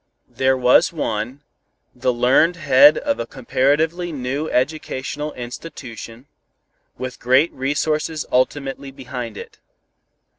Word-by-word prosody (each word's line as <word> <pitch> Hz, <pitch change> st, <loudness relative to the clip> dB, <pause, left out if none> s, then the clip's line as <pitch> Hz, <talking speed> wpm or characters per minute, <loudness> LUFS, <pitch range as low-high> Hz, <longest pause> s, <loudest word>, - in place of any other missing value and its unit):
There 130 Hz, 0 st, +2 dB
was 125 Hz, 0 st, +4 dB
one, 125 Hz, -3 st, -3 dB, 0.5 s
the 125 Hz, +1 st, 0 dB
learned 125 Hz, +8 st, +3 dB
head 145 Hz, -1 st, +6 dB
of 285 Hz, -1 st, -1 dB
a -, -, -3 dB
comparatively 145 Hz, +7 st, 0 dB
new 140 Hz, +2 st, -3 dB
educational 150 Hz, +2 st, -2 dB
institution, 120 Hz, -2 st, -9 dB, 0.7 s
with 130 Hz, -1 st, -6 dB
great 130 Hz, +6 st, +3 dB
resources 150 Hz, +3 st, -1 dB
ultimately 135 Hz, +2 st, 0 dB
behind 125 Hz, -4 st, -7 dB
it. -, -, -10 dB
135 Hz, 105 wpm, -21 LUFS, 125-150 Hz, 0.7 s, head